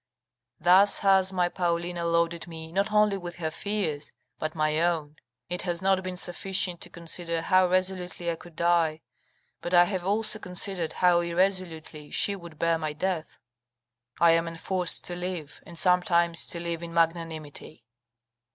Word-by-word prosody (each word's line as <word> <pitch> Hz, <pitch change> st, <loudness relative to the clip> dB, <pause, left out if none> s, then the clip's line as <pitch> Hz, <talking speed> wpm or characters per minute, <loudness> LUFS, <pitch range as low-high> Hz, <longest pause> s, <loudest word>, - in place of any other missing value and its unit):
Thus 185 Hz, +5 st, +5 dB
has 190 Hz, -1 st, +4 dB
my 180 Hz, -2 st, +1 dB
Paulina 175 Hz, -1 st, -2 dB
loaded 170 Hz, 0 st, 0 dB
me 160 Hz, -1 st, -9 dB
not 195 Hz, +4 st, 0 dB
only 210 Hz, -1 st, +3 dB
with 175 Hz, -1 st, -7 dB
her 160 Hz, -2 st, -3 dB
fears, 165 Hz, -6 st, -3 dB, 0.3 s
but 155 Hz, +1 st, -4 dB
my 155 Hz, 0 st, +1 dB
own; 160 Hz, -3 st, -1 dB, 0.3 s
it 180 Hz, 0 st, -3 dB
has 175 Hz, -2 st, -2 dB
not 190 Hz, 0 st, +2 dB
been 185 Hz, -1 st, -5 dB
sufficient 180 Hz, 0 st, +2 dB
to 175 Hz, -, -5 dB
consider 170 Hz, -1 st, -4 dB
how 185 Hz, 0 st, +4 dB
resolutely 180 Hz, -2 st, -1 dB
I -, -, -3 dB
could 170 Hz, 0 st, -15 dB
die, 170 Hz, -2 st, +1 dB, 0.6 s
but 175 Hz, +1 st, -1 dB
I 175 Hz, -, +8 dB
have 185 Hz, 0 st, -2 dB
also 215 Hz, +3 st, -1 dB
considered 180 Hz, -3 st, -1 dB
how 180 Hz, -1 st, +4 dB
irresolutely 170 Hz, -4 st, -1 dB
she 200 Hz, -, +3 dB
would 170 Hz, -4 st, -12 dB
bear 165 Hz, +1 st, +1 dB
my 155 Hz, -1 st, -3 dB
death. 165 Hz, 0 st, -3 dB, 0.8 s
I 170 Hz, -1 st, +6 dB
am 165 Hz, 0 st, +2 dB
enforced 175 Hz, +2 st, +1 dB
to 175 Hz, -, -2 dB
live, 175 Hz, -4 st, -6 dB
and 170 Hz, -, -10 dB
sometimes 170 Hz, -1 st, +2 dB
to 170 Hz, -, +1 dB
live 170 Hz, -1 st, -4 dB
in 170 Hz, -1 st, -8 dB
magnanimity." 160 Hz, -6 st, -2 dB
175 Hz, 160 wpm, -27 LUFS, 165-185 Hz, 0.8 s, I